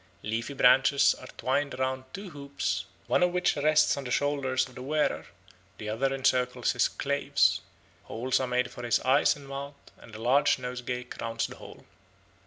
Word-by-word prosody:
Leafy 115 +6 -3
branches 135 +2 +5
are 130 - -12
twined 140 +1 -1
round 130 0 -2
two 195 -2 -8
hoops, 140 - -3 0.2
one - - +2
of 180 0 +3
which 180 0 +1
rests 155 +1 +3
on 140 - -5
the 125 - -6
shoulders 135 -1 0
of 130 - -16
the 125 - -9
wearer, 150 +3 -1 0.5
the 105 - -7
other 120 +6 0
encircles 130 -2 +1
his - - +2
claves; - - +1 0.4
holes 125 +3 -1
are 130 - -1
made 125 0 0
for - - -9
his 120 -1 +2
eyes 135 +3 +3
and 140 -1 -13
mouth; 140 +1 -6 0.2
and 115 - -13
a - - -8
large 125 +5 +3
nosegay 125 -1 -4
crowns 115 -2 -4
the - - -9
whole. - - -13
130 Hz, 180 wpm, -28 LUFS, 125-140 Hz, 0.5 s, branches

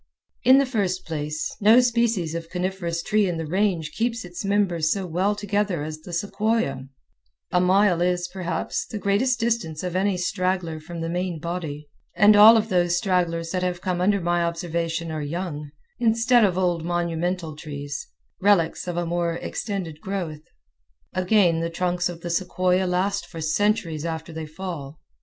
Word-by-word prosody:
In 260 +1 +7
the 275 - +4
first 200 -8 -1
place, 150 -1 -3
no 220 +4 +7
species 235 -9 +1
of 165 0 -5
coniferous 180 -2 -2
tree 210 -2 +2
in 175 -2 -2
the 160 - -3
Range 175 -2 0
keeps 230 0 -2
its 175 +2 -7
members 195 -6 +1
so 195 -2 -1
well 185 +5 0
together 205 -5 -1
as 155 0 -6
the 170 +3 -11
sequoia; 200 -6 -1 0.7
a 180 - +3
mile 185 -1 +3
is, 180 0 +1
perhaps, 180 -2 -3
the 215 - -5
greatest 205 +6 +1
distance 225 -10 -1
of 180 -1 -3
any 190 0 +1
straggler 180 -3 -1
from 165 +2 -8
the 165 - -2
main 175 -1 -2
body, 155 -3 -5 0.3
and 210 0 +6
all 215 +2 +9
of 220 0 0
those 175 -2 +2
stragglers 175 -4 0
that 185 - -1
have 180 -1 -2
come 180 -2 -1
under 200 +2 +3
my 175 -1 +1
observation 170 -1 -2
are 155 -1 -3
young, 150 -1 -4 0.3
instead 235 +1 +4
of 185 -3 +2
old 175 -3 +1
monumental 170 -1 -2
trees, 145 -1 -6 0.3
relics 185 -4 +2
of 175 -1 -3
a 175 - 0
more 170 0 0
extended 175 -4 -4
growth. 175 -6 -4 0.7
Again, 185 -2 +3
the 165 - -1
great 165 - -10
trunks 180 0 0
of 170 -1 -8
the 175 - -4
sequoia 185 +1 +1
last 195 +3 0
for 165 - -9
centuries 165 -1 0
after 160 0 -4
they 160 -1 -5
fall. 155 -4 -7
180 Hz, 170 wpm, -24 LUFS, 165-200 Hz, 0.7 s, all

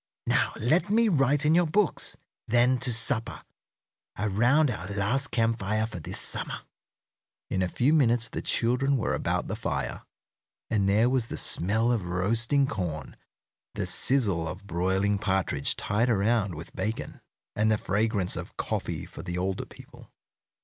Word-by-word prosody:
"Now - - +1
let 155 - +1
me 225 +2 +3
write 145 -3 +2
in 155 - +4
your 175 0 +3
books; 200 +5 0 0.3
then 125 +2 +3
to 125 0 +3
supper, 115 0 0 0.7
around 120 +8 +2
our 95 -5 -6
last 100 +8 0
camp 115 -1 0
fire 110 +2 0
for 110 -5 -7
this 75 - -1
summer." - - 0 0.9
In 95 - 0
a 90 - +1
few 130 - +1
minutes 120 -6 +3
the - - -5
children 130 +4 +1
were 115 - -1
about - - -1
the - - -3
fire, - - -3 0.7
and 100 -3 +2
there 110 +4 +3
was 125 -2 0
the - - -6
smell 110 +7 +2
of 120 -3 0
roasting 115 +10 +1
corn, 90 - -5 0.6
the - - -2
sizzle 100 -12 +2
of 90 +5 -8
broiling 95 +3 0
partridge 95 -8 0
tied 110 +4 0
around 105 -3 +1
with 80 +2 -10
bacon, 105 +4 -4 0.3
and 110 +1 +2
the 110 - +3
fragrance 105 -2 0
of - - -8
coffee - - -3
for - - -10
the 90 0 -5
older 95 +1 -2
people. - - -15
110 Hz, 155 wpm, -27 LUFS, 95-125 Hz, 0.9 s, in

